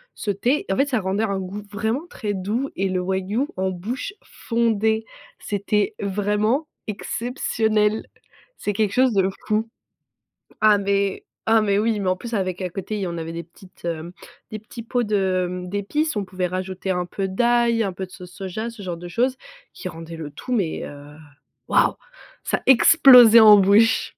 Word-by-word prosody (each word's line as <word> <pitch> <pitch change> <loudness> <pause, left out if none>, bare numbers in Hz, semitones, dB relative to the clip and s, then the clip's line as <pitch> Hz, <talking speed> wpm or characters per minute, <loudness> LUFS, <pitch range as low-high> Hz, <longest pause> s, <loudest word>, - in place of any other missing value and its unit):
ce 210 - -5
thé. 245 +9 0
En - - +1
fait, 275 +1 +2
ça 250 -5 +1
rendait 195 +3 -1
un 200 -3 -1
goût 195 +2 -6
vraiment 220 +9 -2
très 210 -2 -4
doux 215 +8 -2
et 195 0 -1
le 185 -1 -1
Wagyu 190 +8 -1
en 190 0 0
bouche 235 - -5
fondait. 225 -1 0 0.3
C'était 205 +1 -1
vraiment 210 +8 0 0.2
exceptionnel. 220 -1 -1 0.5
C'est 205 - -2
quelque 210 0 0
chose 255 -2 +3
de 190 -1 +2 0.2
fou. 220 +1 0 0.9
Ah 215 -1 +6
mais 200 0 0 0.2
ah 225 0 +5
mais 200 -1 +1
oui, 220 -1 +1
mais 190 -2 0
en 185 - +2
plus 235 +4 -8
avec 185 -2 -2
à 180 - -2
côté, 195 +2 -4
on 170 -1 -5
avait 165 0 -5
des 170 0 -5
petites, 180 +2 -17
heu, 165 0 -4 0.4
des 215 - -5
petits 230 +2 -10
pots 245 +1 -1
de, 190 -4 +1
hem, 180 0 -6
d'épices. 230 - -1
On 200 - -2
pouvait 185 -1 -2
rajouter 185 +1 -5
un 180 -1 -1
peu 195 +2 -3
d'ail, 235 +2 +2
un 195 -3 -2
peu 190 +1 -5
de - - -24
sauce 180 -1 -11
soja, 195 +4 -5
ce 225 -3 -12
genre 175 -2 -4
de 175 +1 -9
choses 255 +7 0 0.4
qui - - -7
rendaient 165 0 -9
le 150 -3 -7
tout 255 - -6
mais, 195 -9 -1
heu, 145 0 -11 0.5
waouh! - - +3 0.5
Ça - - -1
explosait 250 -4 +8
en 210 -2 +9
bouche. 205 +4 +4
205 Hz, 180 wpm, -22 LUFS, 185-225 Hz, 0.9 s, en